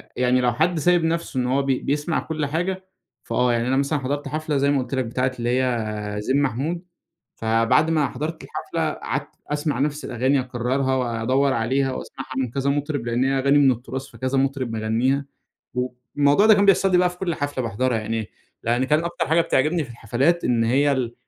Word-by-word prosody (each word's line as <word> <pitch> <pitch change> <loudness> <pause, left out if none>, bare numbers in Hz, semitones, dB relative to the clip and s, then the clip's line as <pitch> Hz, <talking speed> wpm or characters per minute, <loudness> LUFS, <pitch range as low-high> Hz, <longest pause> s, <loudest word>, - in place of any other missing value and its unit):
يعني 125 0 +2
لو 120 -1 +2
حد 160 +6 +1
سايب 175 +2 +3
نَفسه 165 -4 -1
إن 125 - 0
هو 135 +2 +2
بي 135 -2 +1
بيسمع 150 +3 -1
كُلّ 155 -2 -3
حاجة، 180 +6 -2 0.4
فآه 125 -1 +1
يعني 120 +1 0
أنا 130 +1 +2
مثلًا 140 +2 +1
حضرت 145 +2 -3
حفلة 155 -1 -2
زي 140 +1 +2
ما 145 - +2
قولت 125 +1 -3
لك، 130 -1 0
بتاعة 125 +3 -1
اللي 120 0 -1
هي 105 -4 -2
زين 135 +6 +1
محمود، 145 +6 -2 0.5
فبعد 115 +7 +2
ما 155 -4 +2
حضرت 155 +6 -5
الحفلة، - - -3
قعدت - - -4 0.2
أسمع 150 0 -1
نَفس 145 +1 -1
الأغاني، 130 +3 +1
أكرّرها، 130 +2 -1
وادّور 130 +3 +1
عليها، 130 +3 0
وأسمعها 135 +1 -7
من 130 -3 -1
كذا 140 +2 -1
مطرب، 145 -3 -2
لأن 120 +2 +1
هي 135 0 +1
أغاني 140 +2 +4
من 135 -2 +5
التراث، 130 +3 -6
فكذا 130 +1 -2
مطرب 135 -3 -1
مغنّيها، 115 +6 0 0.5
والموضوع 125 - +1
ده 220 - +8
كان 200 0 +3
بيحصل 195 0 +4
لي 180 - +5
بقى 180 0 +3
في 180 - -13
كُلّ 175 -3 -1
حفلة 145 -3 -3
باحضرها 115 +2 0
يعني، 110 0 -3 0.3
لأن 120 +3 +1
كان 150 +4 +2
أكتر 170 0 -2
حاجة 160 +2 +4
بتعجبني 155 +1 +1
في 125 - -12
الحفلات 125 +9 0
إن 120 -2 +2
هي 140 +5 +3
ال 125 -3 -2
135 Hz, 195 wpm, -23 LUFS, 125-150 Hz, 0.5 s, ده